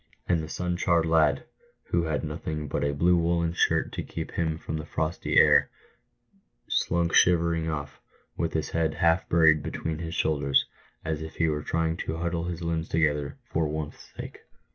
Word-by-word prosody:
And 85 -3 +2
the 80 - -7
sun 90 +2 -2
charred 85 -2 +2
lad, 80 -3 +3 0.5
who 85 -1 +2
had 80 -2 -1
nothing 75 0 -4
but - - -2
a 70 - +1
blue 85 +5 +3
woollen 85 0 +1
shirt - - +1
to - - -4
keep - - -6
him 80 -2 -1
from 80 0 -5
the 75 - -6
frosty 80 +2 -1
air, - - +6 1.0
slunk 85 -1 0
shivering 85 -2 +3
off, 75 -2 -5 0.3
with 85 - -2
his 80 - -2
head 80 -1 0
half 85 +1 +2
buried 80 -2 +5
between 80 +1 -4
his 85 0 -5
shoulders, 70 -3 +2 0.4
as 80 -1 -2
if 80 0 -7
he 80 - +1
were 75 -1 -1
trying 80 +1 -1
to 80 - -4
huddle 85 0 -2
his 85 0 -4
limbs 85 0 -2
together 75 -3 0
for 80 -1 -1
warmth's 75 0 -6
sake. - - -8
80 Hz, 180 wpm, -27 LUFS, 75-85 Hz, 1.0 s, air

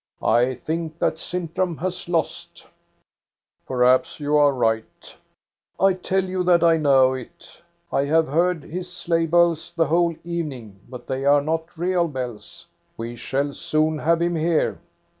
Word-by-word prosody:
I 125 +3 +3
think 160 +5 -4
that 160 -1 -1
Sintram 175 -1 -2
has 180 0 -4
lost" 165 -3 -3 0.5
" - - -54
Perhaps 125 +2 +2
you 150 0 0
are 145 -1 +5
right" 110 -4 -2 0.3
" - - -44
I - - +2
tell 185 +1 -1
you 185 0 -2
that 175 -1 +4
I 165 -1 +5
know 135 -4 +4
it 130 -2 -10 0.3
I 140 - +2
have 160 +2 +2
heard 170 +2 +1
his 180 +2 -6
sleigh 170 -1 -1
bells 170 -1 +2
the 165 -1 +2
whole 170 +1 +1
evening, 140 - -5
but 125 -1 -9
they 135 0 -3
are 145 0 +4
not 160 +2 -3
real 175 0 +1
bells. 125 -7 -7 0.3
We 115 +1 -5
shall 140 +4 -2
soon 155 +1 0
have 165 +2 +2
him 175 0 0
here." 165 0 0
160 Hz, 160 wpm, -23 LUFS, 135-170 Hz, 0.5 s, are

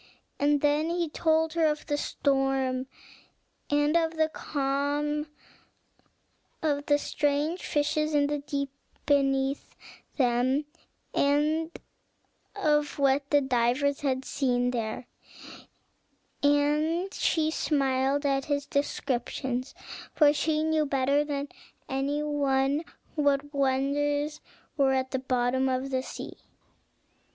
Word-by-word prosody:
And 290 0 +2
then 295 +2 +2
he 340 -1 -1
told 320 +1 +1
her 325 -1 +3
of 300 0 -2
storm 270 -2 0 0.8
and 290 +2 +2
of 325 -1 +2 0.2
calm, 290 +2 -1 1.4
of 290 -2 0
strange 295 +4 -1
fishes 305 +1 0
in 290 -1 +4
the 295 0 -1
deep 280 -1 -3 0.3
beneath 275 -1 +1 0.4
them, 255 +2 +2 0.5
and 300 +3 +2 0.9
of 300 -6 +1
what 275 0 +2
the 290 -1 +4
divers 265 +2 +1
had 265 -2 -1
seen 245 -2 0
there; 230 0 -3 1.4
and 300 +6 +2
she 315 -1 +1
smiled 275 -2 +1
at 275 -1 +1
his 285 -1 -1
descriptions, 260 -2 -2 0.4
for 295 -2 +6
she 305 +1 0
knew 315 -1 +2
better 275 +1 +2
than 285 -1 -3 0.4
any 280 +1 -1
one 280 0 +1 0.3
what 290 -1 +1
wonders 285 +2 0 0.4
were 270 -2 +3
at 260 0 -1
the 265 - -1
bottom 260 0 +1
of 260 +1 -2
the 260 -1 0
sea. - - -8
285 Hz, 105 wpm, -28 LUFS, 270-295 Hz, 1.4 s, for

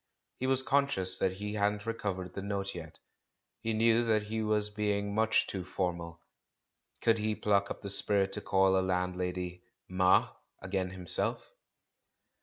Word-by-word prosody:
He 130 - -1
was 130 0 +3
con 140 +1 +3
scious 95 -8 0
that 95 - +1
he 105 +2 -5
hadn't 105 0 0
recovered 100 -5 -3
the 100 - -5
note 100 0 -3
yet, 80 -3 -9 0.6
he 115 - -2
knew 115 +1 +3
that 110 -2 +2
he 110 +2 -3
was 105 -1 0
being 100 -1 -1
much 110 +1 +3
too 95 -2 -4
formal. 85 -2 -3 0.8
Could 115 -1 +3
he 105 0 0
pluck 100 -1 +1
up - - -6
the 100 - -3
spirit 100 -1 +1
to - - -3
call 95 0 +3
a - - +2
landlady 90 -1 -2 0.2
"Ma" 95 0 +4 0.3
again 95 0 -2
himself? 90 -2 -2
100 Hz, 160 wpm, -31 LUFS, 90-105 Hz, 0.8 s, Ma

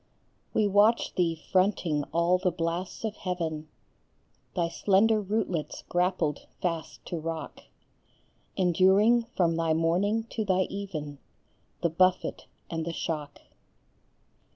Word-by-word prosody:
We 215 - +2
watch 205 +4 +3
thee 170 -2 +1 0.2
fronting 180 -6 +2
all 170 +2 +2
the 185 0 +2
blasts 170 +4 -3
of 215 -1 -3
heaven, 160 -4 -3 0.9
Thy 170 -1 +1
slender 205 +5 +3
rootlets 195 -6 -2
grappled 175 -4 0
fast 165 -3 -3
to 170 - -4
rock, 165 0 -6 0.9
Enduring 195 +6 +4
from 170 -3 +3
thy 165 -1 +1
morning 185 +7 +1
to 220 - -1
thy 190 -2 +2
even 155 -8 -5 0.6
The 170 - +2
buffet 185 +2 +1 0.2
and 165 -1 -3
the 170 +1 -4
shock. 150 -3 -4
180 Hz, 115 wpm, -28 LUFS, 165-195 Hz, 0.9 s, Enduring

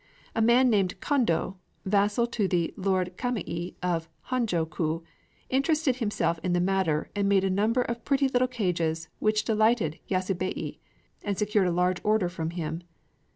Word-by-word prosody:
A 225 - 0
man 240 +3 +5
named 195 -4 +1
Kondō, 195 - +1 0.3
vassal 205 +4 +2
to 230 -4 -1
the 175 -3 0
Lord 185 -2 0
Kamei 190 -8 -3
of 165 -2 -1 0.2
Honjō 220 -11 0
ku, 160 +1 -2 0.5
interested 275 0 +2
himself 210 -7 0
in 180 - 0
the 175 - +2
matter, 180 -4 +1
and 200 -1 +1
made 195 -1 +4
a 195 - +1
number 220 +6 +2
of 235 0 -4
pretty 275 -1 +2
little 255 -1 +2
cages 170 -9 -1
which 215 0 +2
delighted 220 -7 +2
Yasubei, 185 -1 -2 0.4
and 200 -2 -2
secured 210 -2 +2
a - - +1
large 180 +1 +1
order 210 -4 +2
from 165 -2 -3
him. 165 -1 -4
195 Hz, 155 wpm, -27 LUFS, 175-230 Hz, 0.5 s, man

